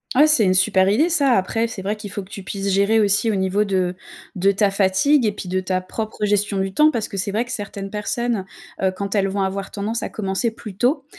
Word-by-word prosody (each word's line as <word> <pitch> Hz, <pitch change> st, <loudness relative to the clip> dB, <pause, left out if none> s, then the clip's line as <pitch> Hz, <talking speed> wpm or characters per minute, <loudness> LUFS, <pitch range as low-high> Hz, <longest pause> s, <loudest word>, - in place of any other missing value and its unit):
Ah, 290 Hz, +4 st, +7 dB
c'est 300 Hz, -7 st, +5 dB
une 185 Hz, -2 st, +3 dB
super 190 Hz, 0 st, +3 dB
idée, 240 Hz, +11 st, +3 dB
ça. 285 Hz, -6 st, +3 dB
Après, 225 Hz, +3 st, 0 dB
c'est 205 Hz, -4 st, -7 dB
vrai 205 Hz, +2 st, -1 dB
qu'il 210 Hz, -1 st, -8 dB
faut 205 Hz, 0 st, -5 dB
que 190 Hz, -, -18 dB
tu 200 Hz, -, -7 dB
puisses 195 Hz, +1 st, -4 dB
gérer 200 Hz, +3 st, +3 dB
aussi 205 Hz, +2 st, +2 dB
au 215 Hz, -, 0 dB
niveau 190 Hz, +2 st, +1 dB
de 185 Hz, -3 st, 0 dB, 0.4 s
de 195 Hz, +1 st, +3 dB
ta 200 Hz, 0 st, +1 dB
fatigue 195 Hz, +9 st, +3 dB
et -, -, +1 dB
puis 200 Hz, -2 st, -8 dB
de 185 Hz, +1 st, 0 dB
ta 185 Hz, 0 st, -2 dB
propre 215 Hz, +3 st, -4 dB
gestion 205 Hz, 0 st, +1 dB
du 190 Hz, 0 st, -2 dB
temps 300 Hz, +6 st, +5 dB
parce 230 Hz, -8 st, -2 dB
que -, -, -9 dB
c'est 195 Hz, +1 st, 0 dB
vrai 220 Hz, +4 st, 0 dB
que 245 Hz, -, -8 dB
certaines 200 Hz, -2 st, -5 dB
personnes, 220 Hz, 0 st, -2 dB, 0.4 s
heu, 190 Hz, -1 st, +2 dB
quand 200 Hz, +1 st, -5 dB
elles 200 Hz, -2 st, +2 dB
vont 195 Hz, 0 st, -1 dB
avoir 195 Hz, 0 st, -3 dB
tendance 215 Hz, +3 st, -3 dB
à -, -, -4 dB
commencer 195 Hz, +2 st, -1 dB
plus 220 Hz, -3 st, -10 dB
tôt, 265 Hz, -, 0 dB
200 Hz, 250 wpm, -21 LUFS, 190-225 Hz, 0.4 s, Ah